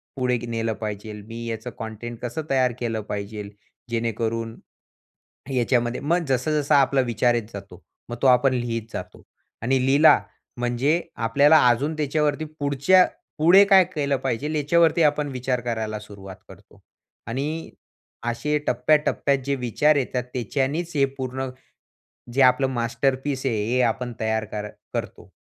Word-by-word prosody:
पुढे 125 -2 0
नेलं 115 -1 -2
पाहिजेल, 105 0 -6
मी 115 +1 -7
याचं 115 +1 -4
कंटेंट 115 +1 -6
कसं 120 +5 -4
तयार 130 -2 +2
केलं 115 -2 -2
पाहिजेल? 105 0 -5 0.4
जेणेकरून 115 0 -2 1.0
याच्यामध्ये 120 -1 +1
मग 170 +5 0
जस-जसा 145 +3 +2
आपला 135 0 +2
विचार 120 +1 +2
येत 120 - 0
जातो, 95 -2 -10 0.3
मग 120 - -5
तो - - +4
आपण 130 +1 +4
लिहीत 120 -2 -2
जातो - - -7 0.4
आणि 130 +3 +2
लिहिला 145 +4 +6 0.4
म्हणजे 125 +7 +1 0.3
आपल्याला 145 +7 +5
अजून 135 +6 +1
त्याच्यावरती 150 0 0
पुढच्या 145 +6 +4 0.3
पुढे 175 +6 +7
काय 195 -2 +6
केलं 140 -3 0
पाहिजे 135 +2 -2
याच्यावरती 165 +3 +3
आपण 150 -1 +2
विचार 125 0 -2
करायला 110 -3 -3
सुरुवात 100 -2 -11
करतो - - -17 0.5
आणि 145 +8 -4 0.6
असे 150 +6 -1
टप्प्याटप्प्यात 140 +2 +2
जे 140 - +1
विचार 135 +4 +2
येतात 125 -2 -1
त्याच्यानीच 140 +7 -2
हे 140 - +4
पूर्ण 130 0 -3 0.8
जे 135 +3 +3
आपलं 130 +1 +5
मास्टरपीस 130 +3 -1
आहे 110 -5 0
हे 125 +4 0
आपण 120 +1 -1
तयार 110 0 0
कर 105 0 -5 0.3
करतो. - - -5
125 Hz, 135 wpm, -23 LUFS, 115-145 Hz, 1.0 s, पुढे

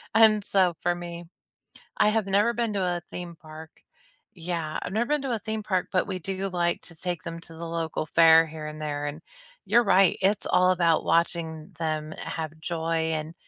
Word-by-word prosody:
And, 215 -2 +6
so, 185 -4 +2
for 175 0 +1
me, 175 0 -7 0.7
I 210 - +4
have 215 -2 0
never 205 +4 +3
been 230 -2 -1
to 195 - -1
a 175 -1 -1
theme 175 -1 -7
park. 155 0 -11 0.7
Yeah, 165 -2 -3
I've - - -5
never 235 +2 0
been 295 -1 +1
to 250 -4 -1
a - - -4
theme 220 -1 -4
park, 185 -3 0
but 185 +1 +1
we 185 -2 -3
do 195 +2 -3
like 175 -1 0
to 165 - -14
take 175 +1 -4
them 165 -1 -6
to 165 0 -13
the 170 - -6
local 165 -1 -3
fair, 165 0 +6
here 155 -1 -7
and 155 0 -8
there, 145 -1 -3
and, 150 +3 -6 0.4
you're 240 0 +4
right, 195 -2 +4
it's 200 +2 +2
all 185 0 +4
about 170 -3 +2
watching 165 -1 0
them 155 -1 -2
have 160 -2 -5
joy, 165 -1 -1
and 155 +1 -4
175 Hz, 200 wpm, -26 LUFS, 160-195 Hz, 0.7 s, And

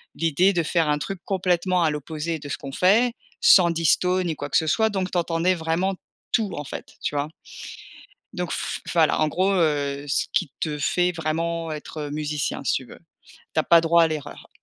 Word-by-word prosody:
l'idée 165 +5 +2
de 170 - +1
faire 160 -1 +1
un 150 - +2
truc 195 +5 -5
complètement 180 -1 +1
à 160 - +3
l'opposé 155 +2 -4
de 145 - -9
ce - - -3
qu'on 140 -1 -8
fait, 220 - +3 0.3
sans 175 -3 +7
disto 180 +3 +2
ni 165 -3 -2
quoi 145 0 -6
que - - +3
ce 160 - +1
soit 220 +7 +2
donc 190 -3 -2
tu - - -1
entendais 170 +1 +1
vraiment 170 +4 -1 0.4
tout 215 -4 +1
en 145 - -4
fait, - - -8
tu 145 - -3
vois? 145 +1 -1 1.0
Donc 180 -2 -3
f - - -3
voilà, 160 -3 +3
en 155 - +3
gros, 185 +5 +1
heu, 145 -5 0
ce 140 - +1
qui 185 -8 0
te 150 -2 -2
fait 180 +6 +1
vraiment 165 0 -2
être 150 0 -6
musicien 150 -1 -2
si - - +1
tu - - -2
veux, - - -13 0.6
tu - - +3
as - - 0
pas 170 - +6
droit 170 +1 +4
à 165 - +4
l'erreur 155 -3 -7
165 Hz, 205 wpm, -24 LUFS, 150-180 Hz, 1.0 s, sans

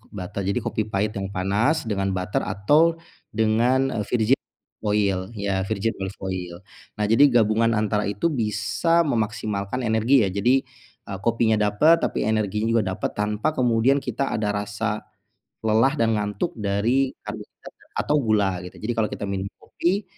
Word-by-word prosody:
kok 115 - -26
butter. 95 +1 -5
Jadi 100 +5 0
kopi 110 - -1
pahit 105 +1 -1
yang 95 -1 -3
panas 105 - +1
dengan 100 -3 -1
butter 90 +2 -1
atau 150 - +3 0.3
dengan, 115 +5 +2
eee, 110 - -1
virgin 125 +2 +2 0.4
oil, 100 -3 +1
ya 100 -2 -1
virgin 110 +1 0
olive 95 +1 -5
oil. 90 -2 -4 0.4
Nah, 105 - +1
jadi 115 +7 +6
gabungan 115 -1 +3
antara 105 0 0
itu 105 - 0
bisa 115 +9 +1
memaksimalkan 110 0 -2
energi 110 +3 +3
ya, - - 0
jadi, 125 +7 +2 0.5
eee, 95 - -5
kopinya 115 -1 +2
dapat, 130 +12 +4
tapi - - -1
energinya 110 0 0
juga 105 - -1
dapat - - -3
tanpa 105 +7 0
kemudian 125 +3 +3
kita 125 +3 -2
ada 105 -1 0
rasa 105 +1 -3 0.6
lelah 110 +5 +3
dan 115 -1 +2
ngantuk 105 -1 -2
dari 110 +6 +1
karbohidrat - - -9
ya - - -22 0.2
atau 150 - +2
gula, 105 -4 +2
gitu. 90 - -10
Jadi 120 - -1
kalau 110 -1 +2
kita - - -5
minum 95 0 -2
kopi, 190 +4 -1
110 Hz, 160 wpm, -23 LUFS, 100-120 Hz, 0.6 s, jadi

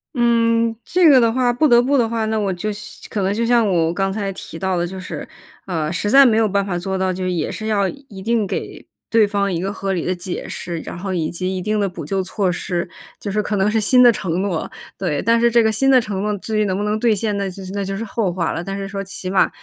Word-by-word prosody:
嗯， 230 -1 +2
这 355 -2 +4
个 265 -3 +7
的 230 -1 +3
话 245 0 +1
不 245 +6 +2
得 240 0 +6
不 275 +3 +2
的 235 -3 +3
话， 225 -1 -1
那 220 0 -1
我 205 -2 0
就 185 +4 -3
像 210 +1 -8 0.3
可 210 - -2
能 190 +1 +1
就 230 +3 0
像 235 -1 +3
我 170 -4 +1
刚 195 +1 0
才 200 -1 -2
提 165 - -9
到 190 0 0
的 175 0 0
就 190 +2 -7
是， 185 - -6 0.4
呃， 160 -5 -1
实 195 +4 -1
在 275 +4 +8
没 230 -4 +4
有 220 -1 +3
办 200 0 +1
法 185 -3 -2
做 190 +2 -3
到， 185 0 0
就 185 0 -4
也 175 -4 -1
是 215 - -5
要 205 -3 +2
一 220 -4 -9
定 225 +1 +1
给 195 - -5 0.2
对 225 -1 +5
方 200 -1 0
一 170 - -2
个 195 +2 -2
合 195 -1 -3
理 175 - -2
的 185 - 0
解 180 0 -5
释， 170 -2 -5
然 175 - -7
后 190 +1 -3
以 160 -3 -1
及 185 +2 -3
一 185 - -3
定 215 +3 0
的 200 - +1
补 175 -3 -7
救 190 +5 -1
措 190 0 -1
施。 175 0 -3 0.3
就 205 - -4
是 210 +2 +1
可 210 0 -2
能 200 +1 +2
是 220 - +2
新 250 +4 +5
的 240 - +8
承 185 -5 -2
诺， 190 -5 -2 0.3
对， 165 -7 -1
但 230 +1 +3
是 235 +1 +4
这 235 0 +4
个 220 - +3
新 270 +5 +2
的 260 -2 +6
承 200 -4 -4
诺 210 0 -1
至 215 +2 -2
于 210 - +2
能 190 -2 -1
不 205 - -2
能 210 +1 0
兑 225 -1 +3
现， 210 0 -1
那 200 -1 -2
就 190 +1 -9
那 200 -1 -2
就 195 +1 -3
是 215 - -4
后 210 -4 -1
话 170 -2 -1
了， - - -3
但 195 +2 -5
是 195 0 -5
说 195 0 -4
起 185 -1 -6
码 190 0 +3
200 Hz, 305 characters per minute, -20 LUFS, 185-225 Hz, 0.4 s, 在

